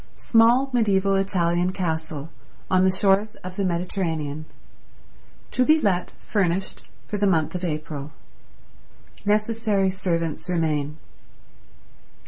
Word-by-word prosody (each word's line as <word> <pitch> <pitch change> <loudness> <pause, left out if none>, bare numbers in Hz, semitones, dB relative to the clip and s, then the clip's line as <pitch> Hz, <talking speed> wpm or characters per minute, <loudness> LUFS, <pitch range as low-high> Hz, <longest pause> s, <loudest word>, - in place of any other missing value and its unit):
Small 240 +4 +4
mediaeval 200 -4 +2
Italian 180 -2 +1
Castle 160 -4 -3 0.4
on 185 0 +4
the 190 - +4
shores 200 +3 +2
of 185 0 -7
the 200 - -1
Mediterranean 170 -4 -2 1.1
to 255 - +2
be 310 +4 +5
Let 185 -8 +1 0.2
furnished 190 -3 -1 0.2
for 210 - -4
the 205 - +3
month 160 -5 +1
of 180 0 -4
April. 150 -3 -4 1.1
Necessary 210 -2 +1
servants 170 -3 -2
remain. 155 -4 -1
185 Hz, 110 wpm, -24 LUFS, 165-205 Hz, 1.1 s, be